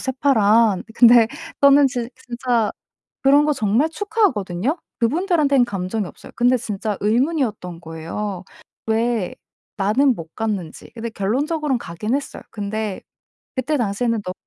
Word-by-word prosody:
새파란. 230 Hz, -6 st, +3 dB
근데 235 Hz, -2 st, +7 dB, 0.3 s
저는 280 Hz, 0 st, +7 dB
진 245 Hz, -3 st, -4 dB, 0.2 s
진짜 235 Hz, -2 st, 0 dB, 0.5 s
그런 280 Hz, +2 st, +5 dB
거 300 Hz, -, +2 dB
정말 235 Hz, +4 st, +1 dB
축하하거든요. 290 Hz, -, 0 dB, 0.2 s
그분들한테는 290 Hz, -, +2 dB
감정이 200 Hz, -1 st, -3 dB
없어요. -, -, -13 dB
근데 245 Hz, +1 st, +4 dB
진짜 210 Hz, -3 st, -3 dB
의문이었던 220 Hz, -, 0 dB
거예요. 175 Hz, +4 st, -5 dB, 0.4 s
'왜 225 Hz, -3 st, 0 dB, 0.4 s
나는 235 Hz, +7 st, +3 dB
못 165 Hz, -1 st, -10 dB
갔는지.' 205 Hz, -7 st, -4 dB
근데 230 Hz, 0 st, -5 dB
결론적으론 270 Hz, +7 st, -1 dB
가기는 210 Hz, +8 st, -3 dB
했어요. 285 Hz, -, -6 dB
근데 210 Hz, -1 st, -4 dB, 0.6 s
그때 260 Hz, +4 st, -1 dB
당시에는 230 Hz, 0 st, 0 dB
너무 185 Hz, -, -4 dB
230 Hz, 310 characters per minute, -21 LUFS, 205-270 Hz, 0.6 s, 근데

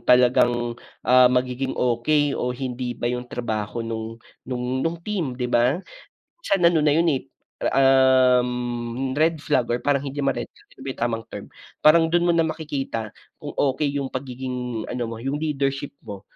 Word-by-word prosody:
talagang, 120 Hz, -1 st, +3 dB, 0.3 s
ah, 125 Hz, 0 st, +6 dB
magiging 125 Hz, +1 st, -1 dB
okey 140 Hz, +4 st, +2 dB
o 125 Hz, 0 st, -2 dB
hindi 125 Hz, -2 st, -4 dB
ba -, -, -6 dB
yung 125 Hz, 0 st, -5 dB
trabaho 115 Hz, -1 st, -3 dB
no'ng 115 Hz, 0 st, -5 dB, 0.3 s
no'ng 125 Hz, -1 st, -3 dB, 0.2 s
no'ng 165 Hz, +3 st, -1 dB
team, 170 Hz, -12 st, -2 dB
'di 125 Hz, -, -3 dB
ba? 125 Hz, +3 st, +2 dB, 0.6 s
Minsan 195 Hz, -, 0 dB
ano 170 Hz, -1 st, +5 dB
na 145 Hz, -, +4 dB
yun 165 Hz, +1 st, +3 dB
eh, 135 Hz, -3 st, -1 dB, 0.5 s
um, 125 Hz, -2 st, +3 dB
red 160 Hz, -1 st, +2 dB
flag 125 Hz, -, +1 dB
or 120 Hz, -, -1 dB
parang 140 Hz, -1 st, +1 dB
hindi 140 Hz, +1 st, -4 dB
naman 135 Hz, -, 0 dB
red -, -, -27 dB
flag, -, -, -24 dB
ano -, -, -14 dB
ba -, -, -3 dB
yung -, -, -15 dB
tamang 115 Hz, -1 st, -4 dB
term? -, -, -6 dB, 0.4 s
Parang 160 Hz, +2 st, +6 dB
do'n 175 Hz, +1 st, +1 dB
mo -, -, +4 dB
na 165 Hz, -, +3 dB
makikita 140 Hz, -8 st, -4 dB, 0.3 s
kung -, -, -6 dB, 0.2 s
okey 145 Hz, 0 st, -1 dB
yung 135 Hz, -2 st, -4 dB
pagiging 125 Hz, -3 st, -4 dB
ano 120 Hz, -2 st, -3 dB
mo, 115 Hz, -, -6 dB
yung 135 Hz, +5 st, -3 dB
leadership 140 Hz, -2 st, -2 dB
mo, 100 Hz, -2 st, -7 dB
130 Hz, 175 wpm, -23 LUFS, 120-145 Hz, 0.6 s, ah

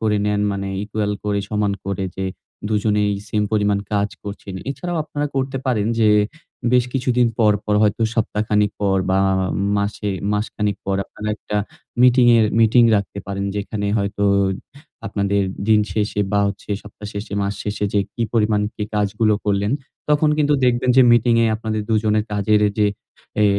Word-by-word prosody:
করে 110 Hz, -1 st, +1 dB
নেন। 105 Hz, 0 st, +1 dB
মানে 100 Hz, 0 st, -3 dB
equal 105 Hz, 0 st, -2 dB
করে, 105 Hz, -1 st, 0 dB
সমান 105 Hz, -1 st, 0 dB
করে 100 Hz, -1 st, -2 dB
যে 95 Hz, -, -2 dB, 0.4 s
২ 110 Hz, -, 0 dB
জনেই 105 Hz, -1 st, +2 dB, 0.2 s
সেইম 105 Hz, -1 st, 0 dB
পরিমাণ 105 Hz, -1 st, +2 dB
কাজ 100 Hz, 0 st, +1 dB
করছেন। 100 Hz, -1 st, -7 dB, 0.2 s
এছাড়াও 175 Hz, +4 st, -4 dB
আপনারা 145 Hz, -1 st, -3 dB
করতে 135 Hz, 0 st, -1 dB
পারেন 110 Hz, -5 st, +1 dB
যে, 110 Hz, -1 st, +5 dB, 0.6 s
বেশ 125 Hz, -1 st, +4 dB
কিছুদিন 125 Hz, -2 st, +2 dB
পর, 110 Hz, -2 st, +5 dB
পর 105 Hz, -, 0 dB
হয়তো 105 Hz, +2 st, +2 dB
সপ্তাহ 105 Hz, -2 st, 0 dB
খানেক 105 Hz, -1 st, +2 dB
পর 100 Hz, -2 st, +2 dB
বা, 95 Hz, -, +3 dB
আ -, -, +2 dB, 0.4 s
মাসে 100 Hz, +1 st, -2 dB, 0.2 s
মাসখানেক 105 Hz, -1 st, -1 dB
পর 95 Hz, 0 st, 0 dB
আপনারা 105 Hz, +2 st, -7 dB
একটা 105 Hz, -, -5 dB, 0.5 s
মিটিংয়ের 120 Hz, -3 st, +6 dB
মিটিং 115 Hz, +2 st, +5 dB
রাখতে 100 Hz, 0 st, -3 dB
পারেন। 100 Hz, 0 st, -3 dB
যেখানে 100 Hz, 0 st, -3 dB
হয়তো 100 Hz, 0 st, -1 dB, 0.8 s
আপনাদের 100 Hz, 0 st, 0 dB, 0.3 s
দিন 110 Hz, -1 st, +5 dB
শেষে 105 Hz, -1 st, -1 dB
বা, 100 Hz, -, +3 dB
হচ্ছে 100 Hz, +1 st, -8 dB
সপ্তাহ 105 Hz, 0 st, -11 dB
শেষে, 100 Hz, 0 st, -6 dB
মাস 100 Hz, +1 st, -1 dB
শেষে 105 Hz, 0 st, -2 dB
যে 100 Hz, -, +4 dB, 0.2 s
কি 120 Hz, -, -2 dB
পরিমাণ 105 Hz, -2 st, +2 dB
কি 105 Hz, -, -5 dB
কাজগুলো 105 Hz, +1 st, +1 dB
করলেন, 100 Hz, +2 st, +1 dB, 0.4 s
তখন 150 Hz, +1 st, +3 dB
কিন্তু 150 Hz, -1 st, +3 dB
দেখবেন 125 Hz, 0 st, +2 dB
যে 130 Hz, -, +8 dB
মিটিংয়ে 115 Hz, 0 st, +4 dB
আপনাদের 110 Hz, -1 st, -3 dB
২ 110 Hz, -, +2 dB
জনের 105 Hz, 0 st, +2 dB
কাজের 105 Hz, +1 st, +2 dB
এ 105 Hz, -, +1 dB
যে, 105 Hz, -, +4 dB, 0.6 s
এ -, -, +5 dB
105 Hz, 170 wpm, -20 LUFS, 100-115 Hz, 0.8 s, যে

